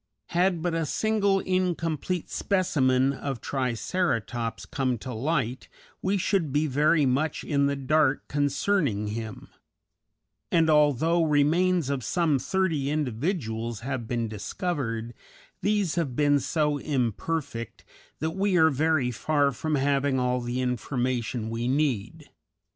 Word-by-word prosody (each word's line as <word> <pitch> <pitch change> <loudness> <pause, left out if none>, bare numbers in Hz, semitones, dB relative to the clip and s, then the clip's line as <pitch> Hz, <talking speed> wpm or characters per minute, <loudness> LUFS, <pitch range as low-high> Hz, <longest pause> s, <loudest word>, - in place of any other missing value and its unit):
Had 175 -1 +1
but 175 -2 0
a 165 -2 -1
single 200 -1 +1
incomplete 180 -2 -1
specimen 135 -9 +1
of 135 -2 -4
Triceratops 120 - -2
come 130 +2 -1
to 125 +4 -7
light 130 0 -2 0.3
we 195 +2 +1
should 185 -5 0
be 150 +3 +2
very 150 +2 +3
much 140 +4 0
in 140 -1 +1
the 140 - 0
dark 140 +1 +1
concerning 145 - 0
him; 110 0 -6 1.0
and 160 -2 +4
although 150 +3 +3
remains 160 +1 +2
of 135 -3 -2
some 165 -4 +1
thirty 165 -5 0
individuals 120 - -2
have 125 -2 -4
been 120 -1 -1
discovered, 115 - -3 0.5
these 205 -5 +1
have 155 -8 -1
been 145 0 +3
so 150 +1 0
imperfect 130 -1 -3 0.3
that 160 +1 -2
we 190 +1 +1
are 160 -2 +5
very 145 -2 +1
far 145 +3 +1
from 155 +4 -2
having 140 -1 +1
all 125 0 0
the 120 +1 -2
information 125 -1 -2
we 115 +1 -2
need. 140 +1 -1
145 Hz, 125 wpm, -26 LUFS, 125-165 Hz, 1.0 s, are